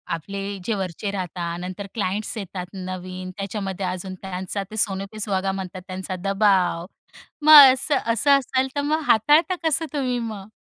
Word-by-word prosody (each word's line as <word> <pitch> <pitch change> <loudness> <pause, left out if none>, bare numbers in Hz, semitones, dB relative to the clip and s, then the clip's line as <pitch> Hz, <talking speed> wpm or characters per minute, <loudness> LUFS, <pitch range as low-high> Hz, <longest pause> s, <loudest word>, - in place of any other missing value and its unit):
आपले 195 +5 -7 0.3
जे 225 - 0
वरचे 190 +1 -4
राहता, 175 -3 -4
नंतर 185 +3 -6
क्लायंट्स 205 +1 -2
येतात 185 -2 -5
नवीन, 185 0 -6
त्याच्यामध्ये 195 -1 -4
अजून 185 +1 -4
त्यांचा 190 +1 -4
ते 220 - -7
"सोने 195 -2 +1
पे 215 - -9
सुहागा" 195 -2 0
म्हणतात 190 -1 -6
त्यांचा 185 0 -5
दबाव. 195 -4 +2 0.6
मग 295 -4 +10
असं 275 +2 +1 0.2
असं 285 +6 +2
असेल 260 0 -1
तर 285 - 0
मग 315 - +2
हाताळता 295 - +4
कसं 320 +1 +2
तुम्ही 255 -3 -1
मग? 215 -4 -6
195 Hz, 160 wpm, -23 LUFS, 185-230 Hz, 0.6 s, मग